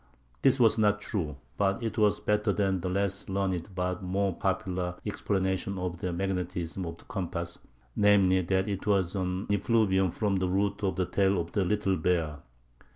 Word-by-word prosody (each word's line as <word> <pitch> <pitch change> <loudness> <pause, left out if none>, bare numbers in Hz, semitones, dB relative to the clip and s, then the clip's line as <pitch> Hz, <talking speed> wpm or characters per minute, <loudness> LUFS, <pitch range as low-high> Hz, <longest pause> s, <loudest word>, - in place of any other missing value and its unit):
This 135 0 +4
was 115 -2 +4
not 105 -1 +3
true, 80 -9 -3 0.2
but 95 +4 +1
it 110 -2 -2
was 105 -1 +3
better 105 0 +1
than 95 -2 0
the 90 - -2
less 100 +1 -1
learned 95 -1 -2
but 90 +1 -1
more 95 0 0
popular 90 -1 -1
explanation 95 -2 -1
of 90 -1 -3
the 90 - -2
magnetism 90 -1 -3
of 85 0 -6
the - - -17
compass—namely, 95 - 0
that 95 +2 0
it 100 0 -3
was 95 -2 +2
"an 95 +1 -2
effluvium 100 -2 +2
from 100 +2 0
the 95 -1 0
root 100 +2 0
of 95 - +1
the 95 - 0
tail 95 0 +2
of 85 0 -4
the 100 - +1
Little 100 0 +1
Bear." 80 -3 0
95 Hz, 170 wpm, -29 LUFS, 90-100 Hz, 0.2 s, This